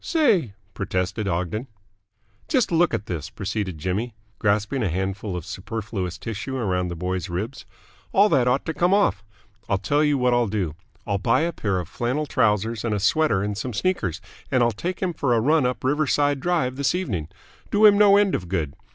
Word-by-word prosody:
"Say!" 210 Hz, -, +2 dB, 0.2 s
protested 95 Hz, +3 st, -2 dB
Ogden. 90 Hz, +7 st, -2 dB, 0.8 s
"Just 260 Hz, -, +1 dB
look 170 Hz, +1 st, +3 dB
at 110 Hz, -2 st, -2 dB
this," 85 Hz, -6 st, -4 dB
proceeded 100 Hz, -3 st, -4 dB
Jimmy, 100 Hz, +9 st, -2 dB, 0.2 s
grasping 105 Hz, +5 st, +1 dB
a 105 Hz, -, +1 dB
handful 95 Hz, +2 st, -3 dB
of 85 Hz, -, -7 dB
superfluous 95 Hz, 0 st, -4 dB
tissue 115 Hz, +7 st, -5 dB
around 90 Hz, -6 st, 0 dB
the 85 Hz, -, -5 dB
boy's 90 Hz, 0 st, -3 dB
ribs. 105 Hz, +10 st, -5 dB, 0.4 s
"All 200 Hz, +2 st, +5 dB
that 130 Hz, -6 st, +3 dB
ought 125 Hz, +2 st, +1 dB
to 160 Hz, -, -2 dB
come 175 Hz, +5 st, +3 dB
off. 105 Hz, -, +2 dB, 0.5 s
I'll 95 Hz, -, +2 dB
tell 145 Hz, +11 st, +1 dB
you 150 Hz, -1 st, +2 dB
what 125 Hz, -1 st, +2 dB
I'll 120 Hz, -1 st, +2 dB
do. 95 Hz, -7 st, -2 dB, 0.3 s
I'll 100 Hz, -1 st, -1 dB
buy 120 Hz, +6 st, +2 dB
a 170 Hz, +1 st, 0 dB
pair 100 Hz, -9 st, -1 dB
of 90 Hz, -, -5 dB
flannel 130 Hz, +6 st, -2 dB
trousers 110 Hz, -3 st, +1 dB
and 110 Hz, -3 st, 0 dB
a -, -, -1 dB
sweater 105 Hz, -3 st, +2 dB
and 105 Hz, 0 st, -2 dB
some 120 Hz, +4 st, -4 dB
sneakers, 105 Hz, -, -1 dB, 0.3 s
and 130 Hz, -2 st, +3 dB
I'll 120 Hz, -, +3 dB
take 175 Hz, -, -4 dB
him 180 Hz, -2 st, 0 dB
for 135 Hz, -6 st, +1 dB
a -, -, +3 dB
run 145 Hz, +3 st, +3 dB
up 125 Hz, -, -4 dB
Riverside 145 Hz, 0 st, +2 dB
Drive 135 Hz, -5 st, 0 dB
this 140 Hz, +4 st, +1 dB
evening. 100 Hz, -, -2 dB, 0.4 s
Do 210 Hz, +1 st, +4 dB
him 205 Hz, -1 st, +8 dB
no 200 Hz, -1 st, +7 dB
end 205 Hz, -2 st, +3 dB
of 90 Hz, -2 st, -2 dB
good. 80 Hz, -7 st, -1 dB
115 Hz, 195 wpm, -24 LUFS, 95-145 Hz, 0.8 s, him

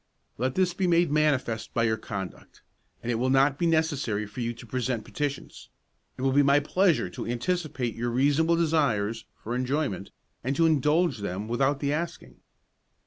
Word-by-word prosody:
"Let 130 Hz, +1 st, 0 dB
this 185 Hz, -2 st, +2 dB
be 185 Hz, +1 st, 0 dB
made 170 Hz, -2 st, +3 dB
manifest 140 Hz, -7 st, 0 dB
by 115 Hz, -, +2 dB
your 110 Hz, -1 st, +2 dB
conduct, 100 Hz, -3 st, -7 dB, 0.4 s
and 120 Hz, -, -1 dB
it 115 Hz, -, -1 dB
will 130 Hz, +2 st, +1 dB
not 135 Hz, +1 st, +3 dB
be 170 Hz, -, +2 dB
necessary 145 Hz, -10 st, 0 dB
for 105 Hz, +4 st, -7 dB
you 120 Hz, 0 st, -1 dB
to 120 Hz, 0 st, -11 dB
present 125 Hz, -1 st, -2 dB
petitions; 145 Hz, -2 st, -5 dB, 0.5 s
it 130 Hz, -, -5 dB
will 135 Hz, -, +3 dB
be 140 Hz, +2 st, +5 dB
my 140 Hz, +1 st, +5 dB
pleasure 170 Hz, -, +2 dB
to -, -, -6 dB
anticipate 130 Hz, -1 st, -2 dB
your 120 Hz, +1 st, -2 dB
reasonable 145 Hz, +7 st, +3 dB
desires 120 Hz, -10 st, +1 dB, 0.2 s
for 115 Hz, -, -3 dB
enjoyment, 125 Hz, -5 st, -1 dB, 0.3 s
and 135 Hz, +3 st, -1 dB
to 165 Hz, -, +3 dB
indulge 155 Hz, -2 st, +2 dB
them 100 Hz, +1 st, -4 dB
without 135 Hz, +4 st, +1 dB
the 140 Hz, 0 st, 0 dB
asking. 150 Hz, -, -5 dB
135 Hz, 175 wpm, -27 LUFS, 115-155 Hz, 0.5 s, be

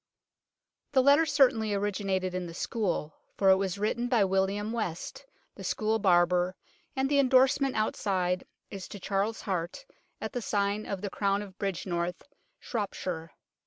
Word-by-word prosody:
The 260 Hz, -2 st, +5 dB
letter 285 Hz, +4 st, +6 dB
certainly 250 Hz, -7 st, +3 dB
originated 195 Hz, -2 st, -1 dB
in 185 Hz, -1 st, -3 dB
the 165 Hz, -, -9 dB
School, 180 Hz, -8 st, -2 dB, 0.2 s
for 195 Hz, -1 st, +5 dB
it 190 Hz, -, +6 dB
was 190 Hz, 0 st, -1 dB
written 220 Hz, +4 st, 0 dB
by 240 Hz, -4 st, +3 dB
William 195 Hz, +3 st, 0 dB
West, 230 Hz, -, -4 dB, 0.3 s
the -, -, -10 dB
school 220 Hz, +1 st, 0 dB
barber, 180 Hz, -1 st, +3 dB, 0.4 s
and 265 Hz, 0 st, +1 dB
the 285 Hz, 0 st, +3 dB
endorsement 265 Hz, +1 st, +4 dB
outside 185 Hz, -4 st, 0 dB, 0.3 s
is 195 Hz, -3 st, -6 dB
to 205 Hz, -, -9 dB
Charles 200 Hz, +4 st, -1 dB
Hart, 185 Hz, -, -3 dB, 0.3 s
at -, -, -5 dB
the 245 Hz, -, -2 dB
sign 205 Hz, 0 st, 0 dB
of 195 Hz, -2 st, -3 dB
The 200 Hz, -2 st, -4 dB
Crown 200 Hz, 0 st, 0 dB
at 195 Hz, -2 st, -12 dB
Bridgnorth, 175 Hz, -2 st, -2 dB, 0.4 s
Shropshire. 180 Hz, -7 st, -4 dB
200 Hz, 150 wpm, -29 LUFS, 185-225 Hz, 0.4 s, letter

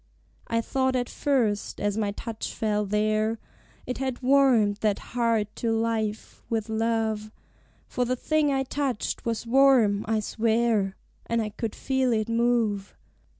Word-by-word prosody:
I 230 Hz, 0 st, +1 dB
thought 260 Hz, +2 st, 0 dB
at 245 Hz, -1 st, 0 dB
first, 235 Hz, -8 st, 0 dB
as 205 Hz, -1 st, 0 dB
my 215 Hz, -2 st, 0 dB
touch 225 Hz, +1 st, -6 dB
fell 210 Hz, -1 st, 0 dB
there, 215 Hz, +2 st, +1 dB, 0.5 s
It 250 Hz, -, -4 dB
had 260 Hz, -1 st, -3 dB
warmed 250 Hz, -6 st, +4 dB
that 210 Hz, -1 st, +1 dB, 0.2 s
heart 230 Hz, -3 st, 0 dB
to 230 Hz, -, -1 dB
life, 225 Hz, -1 st, -2 dB
with 225 Hz, -1 st, -2 dB
love; 220 Hz, -1 st, -1 dB, 0.5 s
For 250 Hz, -, -1 dB
the 250 Hz, +1 st, 0 dB
thing 305 Hz, +3 st, +1 dB
I 270 Hz, -1 st, +1 dB
touched 270 Hz, -3 st, -2 dB
was 230 Hz, 0 st, -2 dB
warm, 240 Hz, -5 st, +4 dB
I 220 Hz, 0 st, +1 dB
swear, 220 Hz, -2 st, +1 dB, 0.3 s
And 230 Hz, 0 st, 0 dB
I 215 Hz, -1 st, -1 dB
could 220 Hz, +1 st, -5 dB
feel 265 Hz, -2 st, 0 dB
it 215 Hz, 0 st, -1 dB
move. 230 Hz, -4 st, +1 dB
225 Hz, 150 wpm, -26 LUFS, 215-250 Hz, 0.5 s, warmed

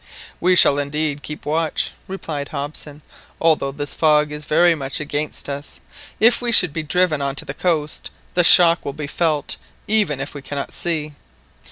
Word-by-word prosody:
"We 180 Hz, +1 st, +3 dB
shall 145 Hz, -4 st, +6 dB
indeed 145 Hz, 0 st, -2 dB
keep 150 Hz, +2 st, -9 dB
watch," 160 Hz, +1 st, -1 dB, 0.2 s
replied 155 Hz, -7 st, -5 dB
Hobson, 145 Hz, 0 st, -7 dB, 0.4 s
"although 155 Hz, -4 st, +2 dB
this 145 Hz, 0 st, -3 dB
fog 150 Hz, -1 st, +2 dB
is 150 Hz, 0 st, -6 dB
very 170 Hz, +3 st, +3 dB
much 135 Hz, -4 st, -4 dB
against 150 Hz, 0 st, -3 dB
us 145 Hz, 0 st, -7 dB, 0.4 s
If 235 Hz, +2 st, +4 dB
we 240 Hz, -1 st, 0 dB
should 180 Hz, -9 st, +5 dB
be 160 Hz, -, -3 dB
driven 155 Hz, -1 st, 0 dB
on 140 Hz, -1 st, -2 dB
to -, -, -3 dB
the -, -, -6 dB
coast, 155 Hz, -4 st, -2 dB, 0.2 s
the 175 Hz, -, +3 dB
shock 170 Hz, 0 st, +7 dB
will 140 Hz, -, -5 dB
be 150 Hz, +1 st, -6 dB
felt 150 Hz, 0 st, -1 dB, 0.3 s
even 205 Hz, -10 st, +1 dB
if 135 Hz, -, -5 dB
we 145 Hz, -, -8 dB
cannot 140 Hz, +1 st, -6 dB
see. 155 Hz, -3 st, -2 dB
150 Hz, 175 wpm, -20 LUFS, 145-165 Hz, 0.4 s, shock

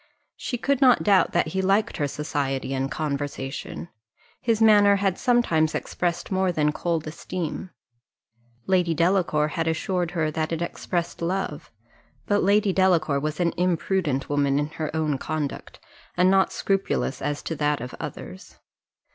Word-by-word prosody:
She 245 Hz, -, -4 dB
could 275 Hz, +3 st, 0 dB
not 255 Hz, -3 st, +5 dB
doubt 200 Hz, -3 st, +4 dB
that 175 Hz, -2 st, +1 dB
he 190 Hz, +4 st, -1 dB
liked 195 Hz, +3 st, +1 dB
her 145 Hz, -, 0 dB
society 140 Hz, -2 st, -2 dB
and 135 Hz, 0 st, -1 dB
conversation; 145 Hz, -1 st, -4 dB, 0.5 s
his 230 Hz, -2 st, +1 dB
manner 205 Hz, -2 st, +6 dB
had 195 Hz, -2 st, 0 dB
sometimes 170 Hz, -11 st, +2 dB
expressed 175 Hz, +1 st, -2 dB
more 190 Hz, -1 st, +2 dB
than 150 Hz, -3 st, +1 dB
cold 165 Hz, 0 st, -2 dB
esteem. 170 Hz, +2 st, -5 dB, 1.0 s
Lady 180 Hz, -3 st, +2 dB
Delacour 170 Hz, -3 st, +2 dB
had 165 Hz, +1 st, -2 dB
assured 175 Hz, +2 st, -1 dB
her 155 Hz, -1 st, +1 dB
that 155 Hz, +1 st, -2 dB
it 165 Hz, -, -1 dB
expressed 170 Hz, 0 st, -3 dB
love; 185 Hz, +3 st, -3 dB, 0.6 s
but 205 Hz, 0 st, +2 dB
Lady 200 Hz, 0 st, +3 dB
Delacour 170 Hz, -7 st, +3 dB
was 150 Hz, +1 st, -3 dB
an 170 Hz, -1 st, +1 dB
imprudent 175 Hz, -5 st, 0 dB
woman 140 Hz, -1 st, +1 dB
in 145 Hz, +1 st, 0 dB
her 155 Hz, -1 st, -4 dB
own 155 Hz, -3 st, 0 dB
conduct, 155 Hz, -2 st, -4 dB, 0.4 s
and 180 Hz, +1 st, +5 dB
not 195 Hz, 0 st, +3 dB
scrupulous 195 Hz, -8 st, -1 dB
as 145 Hz, 0 st, -2 dB
to 165 Hz, -, -3 dB
that 150 Hz, 0 st, +1 dB
of 125 Hz, +1 st, -7 dB
others. -, -, -8 dB
170 Hz, 150 wpm, -25 LUFS, 150-190 Hz, 1.0 s, manner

